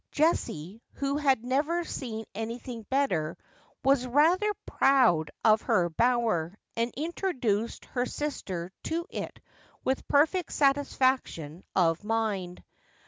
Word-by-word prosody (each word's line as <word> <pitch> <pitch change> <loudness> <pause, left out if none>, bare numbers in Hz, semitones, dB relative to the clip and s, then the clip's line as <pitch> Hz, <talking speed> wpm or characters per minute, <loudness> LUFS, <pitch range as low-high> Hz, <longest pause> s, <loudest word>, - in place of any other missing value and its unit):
Jessie, 225 - 0
who 280 0 -1
had 270 -5 +2
never 300 +7 +1
seen 225 -8 -5
anything 230 +1 -6
better, 180 - 0 0.5
was 270 -2 +3
rather 330 - +4
proud 230 - +3 0.2
of 215 -1 +6
her 175 -1 +2
bower, 220 -5 +1 0.2
and 230 +1 0
introduced 265 - -1
her 250 -1 -2
sister 190 - -4
to 335 +1 -1
it - - -5 0.4
with 265 0 -1
perfect 320 +5 +2
satisfaction 260 - +1
of 170 0 +2
mind. 210 -5 -2
245 Hz, 110 wpm, -28 LUFS, 200-280 Hz, 0.5 s, of